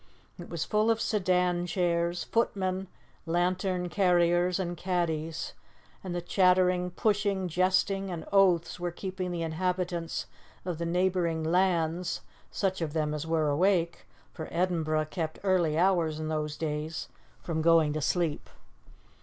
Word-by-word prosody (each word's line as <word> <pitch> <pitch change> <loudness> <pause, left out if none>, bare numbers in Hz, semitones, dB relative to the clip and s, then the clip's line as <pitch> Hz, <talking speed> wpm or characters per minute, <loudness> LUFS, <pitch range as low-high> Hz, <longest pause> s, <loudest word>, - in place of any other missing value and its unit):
It 175 - -9
was 170 -2 -3
full 215 +1 +2
of 225 -1 +2
sedan 180 -4 +1
chairs, 170 -1 0
footmen, 190 -4 -1 0.4
lantern 180 +1 0
carriers 175 -1 +2
and 175 -2 -2
caddies, 165 -3 -2 0.5
and 180 -2 -4
the 175 - -3
chattering, 180 -1 +3
pushing, 200 0 0
jesting, 190 +3 +1
and 170 -3 -5
oaths 185 -4 +3
were 175 0 -1
keeping 185 +1 -5
the 170 -1 -3
inhabitants 175 0 -2 0.4
of 175 -3 -3
the 170 - -2
neighbouring 175 -2 +1
'lands' 175 0 +1 0.3
such 190 -2 -1
of 155 -3 -2
them 155 -2 0
as 150 +1 -4
were 160 -2 +1
awake, 170 +2 +1 0.3
for 160 - -6
Edinburgh 160 -4 0
kept 160 -3 -3
early 175 -5 +2
hours 170 -4 +2
in 155 0 -3
those 150 -1 -2
days 155 0 -3 0.4
from 160 -2 -2
going 165 -2 +4
to 155 - -2
sleep. 165 0 -1
175 Hz, 135 wpm, -29 LUFS, 165-185 Hz, 0.5 s, going